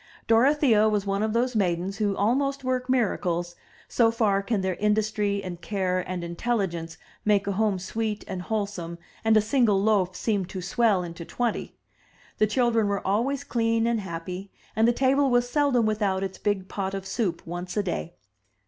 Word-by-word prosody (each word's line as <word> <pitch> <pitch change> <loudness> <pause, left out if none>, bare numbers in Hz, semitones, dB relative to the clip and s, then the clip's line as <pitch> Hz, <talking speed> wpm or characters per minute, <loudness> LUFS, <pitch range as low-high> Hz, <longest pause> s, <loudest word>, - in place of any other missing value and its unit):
Dorothea 230 -2 +4
was 205 -2 0
one 195 0 0
of 220 0 0
those 240 +2 0
maidens 185 -1 0
who 205 -2 0
almost 275 +6 +1
work 255 0 -1
miracles, 175 -8 0 0.3
so 230 -2 +3
far 215 -4 +1
can 205 0 -1
their 190 0 0
industry 210 -1 0
and 175 -2 -6
care 185 -1 -1
and 180 -1 -4
intelligence 170 -3 -2 0.3
make 205 -2 +2
a 200 - -1
home 205 0 +1
sweet 210 +3 -3
and 185 -1 -4
wholesome 200 -4 -3 0.3
and 220 -1 +4
a - - +5
single 215 -2 +2
loaf 195 -3 +2
seem 205 -3 0
to 190 +1 -7
swell 195 +1 +2
into 170 0 -7
twenty. 240 +6 -3 0.6
The 215 - +4
children 230 -2 +2
were 200 0 -2
always 240 +8 0
clean 230 -1 +1
and 235 -1 +1
happy, 180 +1 -6 0.3
and 220 +2 +4
the - - +5
table 270 +3 +2
was 245 -1 +2
seldom 260 -3 +2
without 205 -3 0
its 190 -1 -5
big 200 -3 -1
pot 195 -1 -3
of 195 -1 -5
soup 195 -2 -2
once 175 +2 -5
a 205 - +2
day. 175 -2 -4
205 Hz, 175 wpm, -26 LUFS, 190-230 Hz, 0.6 s, a